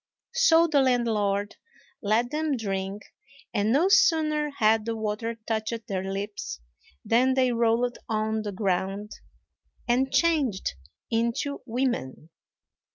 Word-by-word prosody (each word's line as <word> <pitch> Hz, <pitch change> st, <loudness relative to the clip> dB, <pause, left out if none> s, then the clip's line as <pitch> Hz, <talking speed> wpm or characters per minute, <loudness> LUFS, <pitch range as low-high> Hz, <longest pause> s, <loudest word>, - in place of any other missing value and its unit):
So 335 Hz, -10 st, +5 dB
the 300 Hz, -4 st, +3 dB
landlord 215 Hz, -5 st, +1 dB, 0.4 s
let 230 Hz, +4 st, +1 dB
them 305 Hz, -2 st, -1 dB
drink; 195 Hz, -1 st, -3 dB, 0.5 s
and 210 Hz, 0 st, +1 dB
no 300 Hz, +9 st, +4 dB
sooner 305 Hz, -5 st, +3 dB
had 220 Hz, -5 st, +2 dB
the 230 Hz, +1 st, -3 dB
water 220 Hz, +2 st, -3 dB
touched 225 Hz, +1 st, -2 dB
their 190 Hz, -4 st, -2 dB
lips 195 Hz, -, -5 dB, 0.5 s
than 255 Hz, +3 st, +3 dB
they 255 Hz, -1 st, +3 dB
rolled 235 Hz, +1 st, +1 dB
on 220 Hz, 0 st, 0 dB
the 210 Hz, -1 st, -4 dB
ground, 195 Hz, +1 st, -2 dB, 0.8 s
and 260 Hz, +2 st, +2 dB
changed 290 Hz, -, +1 dB, 0.4 s
into 235 Hz, +5 st, -1 dB
women. 230 Hz, -, -2 dB
230 Hz, 115 wpm, -26 LUFS, 210-265 Hz, 0.8 s, So